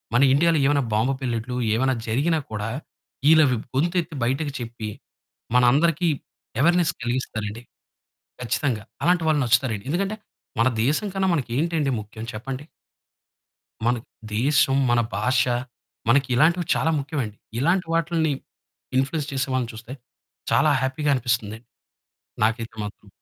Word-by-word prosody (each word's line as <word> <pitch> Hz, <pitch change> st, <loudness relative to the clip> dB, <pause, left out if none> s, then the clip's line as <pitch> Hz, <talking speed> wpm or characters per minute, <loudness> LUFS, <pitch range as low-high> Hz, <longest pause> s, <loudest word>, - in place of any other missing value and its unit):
మన 125 Hz, -, +5 dB
ఇండియాలో 165 Hz, +2 st, +4 dB
ఏమైనా 145 Hz, -1 st, +3 dB
బాంబు 120 Hz, +6 st, +2 dB
పేలినట్టు 120 Hz, 0 st, -2 dB, 0.2 s
ఏమైనా 130 Hz, +2 st, +2 dB
జరిగినా 150 Hz, +8 st, +1 dB
కూడా, 105 Hz, +1 st, -3 dB, 0.6 s
ఇళ్ళవి 155 Hz, -6 st, +6 dB, 0.2 s
గొంతెత్తి 170 Hz, +2 st, 0 dB
బయటకి 140 Hz, +4 st, 0 dB
చెప్పి, 115 Hz, -2 st, -5 dB, 0.7 s
మనందరికి 150 Hz, +7 st, +4 dB, 0.5 s
అవేర్నెస్ 170 Hz, +1 st, +3 dB
కలిగిస్తారండి 115 Hz, -3 st, -3 dB, 0.8 s
కచ్చితంగా, 115 Hz, -2 st, -1 dB, 0.2 s
అలాంటి 175 Hz, -1 st, +3 dB
వాళ్ళు 150 Hz, -2 st, +3 dB
నచ్చుతారండి. 115 Hz, -3 st, +1 dB
ఎందుకంటే 195 Hz, +6 st, -1 dB, 0.4 s
మన 120 Hz, -, +5 dB, 0.2 s
దేశం 155 Hz, +10 st, +1 dB
కన్నా 195 Hz, 0 st, +1 dB
మనకేంటండి 145 Hz, +3 st, 0 dB
ముఖ్యం 110 Hz, +2 st, -9 dB
చెప్పండి? 130 Hz, +5 st, -5 dB, 1.2 s
మన 120 Hz, +1 st, +3 dB, 0.4 s
దేశం, 135 Hz, +2 st, +3 dB
మన 120 Hz, 0 st, +4 dB, 0.2 s
భాష, 125 Hz, 0 st, +2 dB, 0.7 s
మనకి 135 Hz, +2 st, +4 dB
ఇలాంటివి 165 Hz, +5 st, +3 dB
చాలా 160 Hz, -, +2 dB
ముఖ్యమండి. 140 Hz, -7 st, -3 dB, 0.2 s
ఇలాంటి 170 Hz, +7 st, +2 dB
వాటిలిని 165 Hz, -2 st, +1 dB, 0.7 s
ఇంప్ల్యూయన్స్ 140 Hz, +3 st, -1 dB
చేసే 135 Hz, 0 st, -1 dB
వాళ్ళని 120 Hz, -3 st, -1 dB
చూస్తే 115 Hz, +3 st, -9 dB, 0.6 s
చాలా 155 Hz, -, +4 dB
హ్యాపీ‌గా 145 Hz, +3 st, 0 dB
అనిపిస్తుంది 115 Hz, -4 st, -1 dB, 0.9 s
నాకైతే 115 Hz, +1 st, -1 dB
మాత్రం. 105 Hz, 0 st, -9 dB
135 Hz, 115 wpm, -24 LUFS, 120-160 Hz, 1.2 s, ఇళ్ళవి